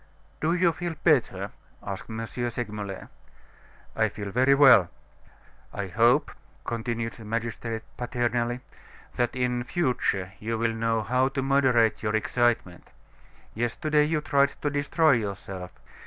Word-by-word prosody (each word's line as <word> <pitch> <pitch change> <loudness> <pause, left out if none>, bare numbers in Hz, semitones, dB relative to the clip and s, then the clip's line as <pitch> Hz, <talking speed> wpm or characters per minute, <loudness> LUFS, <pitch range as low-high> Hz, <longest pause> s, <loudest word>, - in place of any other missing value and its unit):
"Do 165 +3 +1
you 175 -1 +3
feel 175 0 -4
better?" 150 -8 +2 0.3
asked 100 +2 -6
M. 115 0 -4
Segmuller. 110 -5 -5 0.9
"I 110 0 +2
feel 100 -1 -6
very 130 +5 +4
well." 130 - +7 0.8
"I 100 -1 -4
hope," 120 +9 +3 0.3
continued 115 0 -3
the 115 - -12
magistrate, 115 0 -3
paternally, 120 -1 -1 0.5
"that 120 0 -1
in 125 -1 0
future 125 - -1
you 115 +1 -2
will 115 0 0
know 115 0 0
how 125 +3 +2
to 135 0 -2
moderate 130 -5 +3
your 105 -1 0
excitement. 115 -5 0 0.6
Yesterday 150 +7 +1
you 155 0 0
tried 140 -1 +3
to 145 - +1
destroy 145 +2 +2
yourself. 100 -5 -3
120 Hz, 125 wpm, -26 LUFS, 110-135 Hz, 0.9 s, well